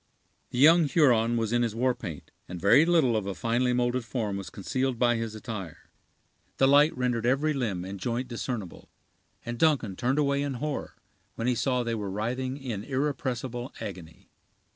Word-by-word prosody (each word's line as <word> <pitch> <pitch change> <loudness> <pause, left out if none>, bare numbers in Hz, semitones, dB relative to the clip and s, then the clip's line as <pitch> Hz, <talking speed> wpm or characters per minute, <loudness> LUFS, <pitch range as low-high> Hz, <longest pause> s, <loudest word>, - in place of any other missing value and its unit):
The - - -6
young 160 +5 +7
Huron 120 -7 +3
was 115 0 -1
in 120 - +3
his 115 -2 -1
war 125 +2 +2
paint, 95 - -8 0.2
and 90 -1 -7
very 100 - +6
little 160 -9 +3
of 105 -3 -1
a 100 - -3
finely 120 +2 +1
molded 125 0 0
form 110 -4 -3
was 100 -1 -6
concealed 130 +5 -2
by 120 0 +3
his 115 -1 -4
attire. 100 -8 -8 0.7
The 135 - +4
light 145 +1 +5
rendered 120 -2 0
every 145 +5 +2
limb 105 -10 -2
and 95 +1 -7
joint 120 +5 -2
discernible, 120 -5 -5 0.6
and 120 0 -5
Duncan 140 -11 +2
turned 125 +7 0
away 140 -1 +2
in 140 -2 -2
horror 145 +3 -4 0.4
when 115 - -3
he 125 - +2
saw 125 +1 0
they 115 -1 -2
were 105 -3 -3
writhing 125 +6 -3
in 120 -8 -5
irrepressible 130 -2 -3
agony. 85 -5 -9
120 Hz, 180 wpm, -27 LUFS, 110-135 Hz, 0.7 s, young